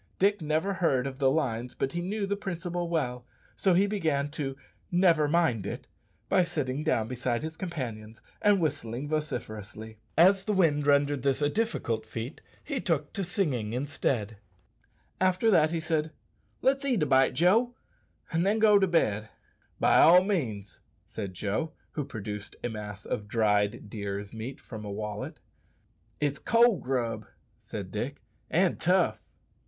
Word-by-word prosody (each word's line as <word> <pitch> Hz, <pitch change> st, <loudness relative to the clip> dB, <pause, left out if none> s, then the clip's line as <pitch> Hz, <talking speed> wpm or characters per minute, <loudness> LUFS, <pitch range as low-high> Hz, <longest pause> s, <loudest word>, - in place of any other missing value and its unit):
Dick 200 Hz, 0 st, +2 dB
never 155 Hz, +6 st, 0 dB
heard 140 Hz, -9 st, +1 dB
of 135 Hz, 0 st, -5 dB
the 135 Hz, -2 st, +4 dB
lines, 125 Hz, -5 st, -1 dB
but 135 Hz, -, -1 dB
he 175 Hz, -, -3 dB
knew 200 Hz, +3 st, -2 dB
the 200 Hz, +1 st, -1 dB
principle 175 Hz, -3 st, -4 dB
well, 125 Hz, -7 st, -1 dB, 0.3 s
so 190 Hz, -3 st, +2 dB
he 190 Hz, +3 st, +5 dB
began 160 Hz, -9 st, 0 dB
to 140 Hz, -2 st, -4 dB, 0.4 s
"never 170 Hz, -4 st, +4 dB
mind 145 Hz, -, +1 dB
it" -, -, -5 dB, 0.4 s
by 185 Hz, -2 st, +4 dB
sitting 150 Hz, -5 st, -2 dB
down 125 Hz, -9 st, +1 dB
beside 125 Hz, +1 st, -2 dB
his 160 Hz, 0 st, -5 dB
companions 120 Hz, -, -6 dB, 0.2 s
and 205 Hz, -1 st, +4 dB
whistling 145 Hz, -5 st, -2 dB
vociferously. 110 Hz, -8 st, -5 dB, 0.2 s
As 190 Hz, +4 st, +6 dB
the 215 Hz, -, 0 dB
wind 150 Hz, -6 st, +2 dB
rendered 145 Hz, -1 st, +3 dB
this 135 Hz, 0 st, +1 dB
a 145 Hz, -1 st, +2 dB
difficult 215 Hz, -, -1 dB
feat, 120 Hz, +7 st, -6 dB, 0.2 s
he 275 Hz, -5 st, -3 dB
took 150 Hz, -4 st, -1 dB
to 195 Hz, -, -2 dB
singing 145 Hz, -, -1 dB
instead. 125 Hz, -5 st, -1 dB, 0.8 s
After 185 Hz, +4 st, +3 dB
that 155 Hz, -5 st, +5 dB
he 165 Hz, 0 st, -1 dB
said, 160 Hz, -1 st, -1 dB, 0.5 s
"Let's 270 Hz, +1 st, +3 dB
eat 250 Hz, -, +1 dB
a -, -, +2 dB
bite, 135 Hz, -2 st, +4 dB
Joe, 220 Hz, -, +3 dB, 0.6 s
and 165 Hz, 0 st, +1 dB
then 205 Hz, +3 st, +2 dB
go 210 Hz, -2 st, +6 dB
to 190 Hz, -, +3 dB
bed." 110 Hz, -, +1 dB, 0.5 s
"Be -, -, 0 dB
all 180 Hz, +3 st, +7 dB
means," 120 Hz, -, -2 dB, 0.3 s
said 100 Hz, -4 st, -6 dB
Joe, 110 Hz, -, -2 dB, 0.2 s
who 150 Hz, -, -3 dB
produced 105 Hz, -2 st, -6 dB
a 120 Hz, -, -1 dB
mass 105 Hz, -2 st, -7 dB
of 105 Hz, -, -3 dB
dried 105 Hz, 0 st, +1 dB
deer's 100 Hz, -1 st, -5 dB
meat 115 Hz, +4 st, -6 dB
from 110 Hz, -3 st, -9 dB
a 105 Hz, -, -6 dB
wallet. 105 Hz, +1 st, -5 dB, 0.8 s
"It's 145 Hz, -1 st, 0 dB
cold 230 Hz, -3 st, +4 dB
grub," 125 Hz, -3 st, -2 dB, 0.3 s
said -, -, -7 dB
Dick, -, -, -4 dB, 0.3 s
"and -, -, +2 dB
tough." -, -, +2 dB
145 Hz, 160 wpm, -28 LUFS, 115-180 Hz, 0.8 s, all